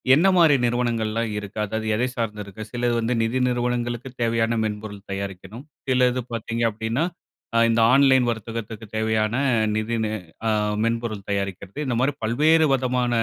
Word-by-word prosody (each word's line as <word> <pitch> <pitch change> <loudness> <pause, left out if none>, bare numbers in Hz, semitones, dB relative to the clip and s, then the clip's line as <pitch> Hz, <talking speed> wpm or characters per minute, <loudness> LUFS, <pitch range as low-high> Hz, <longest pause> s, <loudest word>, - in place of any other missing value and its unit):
என்ன 175 +6 +4
மாரி 160 -4 +6
நிறுவனங்கள்லாம் 115 -2 0
இருக்கா? 105 +1 -7
அதாவது 110 +1 -3
எத 120 - 0
சார்ந்து 105 -3 -3
இருக்கு? 100 +2 -10
சிலது 120 -1 0
வந்து 115 +2 0
நிதி 120 +3 0
நிறுவனங்களுக்கு 120 0 -2
தேவையான 115 0 +1
மென்பொருள் 105 -1 -5
தயாரிக்கணும், 100 +5 -6 0.2
சிலது 125 -1 +2
பாத்தீங்க 115 0 -2
அப்டின்னா, 110 +6 -2 0.5
அ - - +4
இந்த 115 0 +3
ஆன்லைன் 130 -2 +5
வர்த்தகத்துக்கு 115 0 -6
தேவையான 110 0 +1 0.4
நிதி 110 +2 -1
நெ 110 - -1 0.4
ஆ - - +3 0.4
மென்பொருள் 115 -3 -2
தயாரிக்றது, 100 +2 -3
இந்த 125 -3 -1
மாரி 140 +3 +2
பல்வேறு 155 +8 +4
வதமான 125 -1 +1
115 Hz, 145 wpm, -23 LUFS, 110-125 Hz, 0.5 s, மாரி